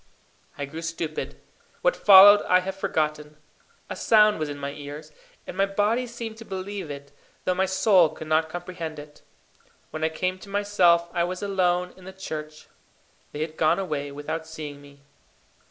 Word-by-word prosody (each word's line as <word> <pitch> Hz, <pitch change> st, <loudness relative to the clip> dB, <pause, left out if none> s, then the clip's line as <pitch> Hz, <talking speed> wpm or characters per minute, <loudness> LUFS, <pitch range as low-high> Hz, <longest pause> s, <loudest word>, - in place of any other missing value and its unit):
I 145 Hz, -, -3 dB
grew 160 Hz, +4 st, -8 dB
stupid. 165 Hz, -1 st, -5 dB, 0.4 s
What -, -, +3 dB
followed 205 Hz, +1 st, +9 dB
I 185 Hz, 0 st, +4 dB
have 190 Hz, +1 st, -5 dB
forgotten. 155 Hz, -6 st, -2 dB, 0.5 s
A -, -, -6 dB
sound 210 Hz, -3 st, +4 dB
was 155 Hz, -1 st, -2 dB
in 145 Hz, -, -6 dB
my 140 Hz, 0 st, -5 dB
ears, 145 Hz, +1 st, -9 dB, 0.3 s
and -, -, -8 dB
my 195 Hz, +1 st, +2 dB
body 210 Hz, +5 st, 0 dB
seemed 230 Hz, -2 st, -7 dB
to 225 Hz, -, -10 dB
believe 195 Hz, -3 st, -6 dB
it, 140 Hz, 0 st, -9 dB, 0.3 s
though 185 Hz, -, +2 dB
my 190 Hz, +1 st, 0 dB
soul 190 Hz, -2 st, +4 dB
could 155 Hz, +1 st, -9 dB
not 155 Hz, +1 st, +1 dB
comprehend 175 Hz, -2 st, -6 dB
it. 150 Hz, 0 st, -12 dB, 0.7 s
When 155 Hz, -, -5 dB
I 160 Hz, -, +2 dB
came 185 Hz, +3 st, -3 dB
to 200 Hz, -, -13 dB
myself 195 Hz, -4 st, +3 dB
I 170 Hz, -2 st, +1 dB
was 180 Hz, +3 st, -4 dB
alone 180 Hz, -2 st, 0 dB
in 185 Hz, -, -16 dB
the 190 Hz, -, -9 dB
church. 155 Hz, -5 st, -7 dB, 0.7 s
They 150 Hz, -, -6 dB
had 155 Hz, 0 st, -4 dB
gone 160 Hz, +2 st, +3 dB
away 150 Hz, -7 st, -3 dB
without 155 Hz, +3 st, -5 dB
seeing 150 Hz, -3 st, -8 dB
me. 140 Hz, 0 st, -17 dB
175 Hz, 175 wpm, -25 LUFS, 155-195 Hz, 0.7 s, followed